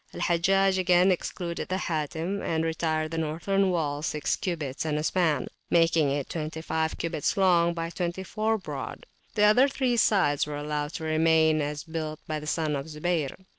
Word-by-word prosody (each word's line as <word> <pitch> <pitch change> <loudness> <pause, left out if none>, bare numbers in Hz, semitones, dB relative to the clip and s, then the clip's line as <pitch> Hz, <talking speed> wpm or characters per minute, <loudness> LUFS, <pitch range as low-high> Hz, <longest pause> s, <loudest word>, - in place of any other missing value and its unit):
Hajjaj 190 +2 +2
again 180 +1 +4
excluded 175 -1 -3
the 185 - -1
Hatim 165 +3 -2
and 160 -1 -1
retired 160 -1 -1
the 165 - -2
northern 180 +5 0
wall 150 -5 -1
six 150 -1 -1
cubits 155 -7 -3
and 155 -2 -1
a 150 - -2
span, 160 -6 +1 0.2
making 165 -3 +3
it 140 0 -2
twenty 160 0 -5
five 160 0 -1
cubits 165 -1 -1
long 170 -3 +4
by 165 0 -3
twenty 175 +1 -3
four 220 +3 0
broad; 190 - -7 0.3
the 210 - +3
other 215 +6 +6
three 255 -3 0
sides 185 -11 +3
were 150 -1 -4
allowed 150 0 -3
to 165 - -5
remain 160 0 +3
as 145 0 -3
built 155 -2 -5
by 155 -1 -3
the 150 - -9
son 155 -2 0
of 140 +2 -4
Zubayr. 160 +1 -2
165 Hz, 175 wpm, -27 LUFS, 155-180 Hz, 0.3 s, other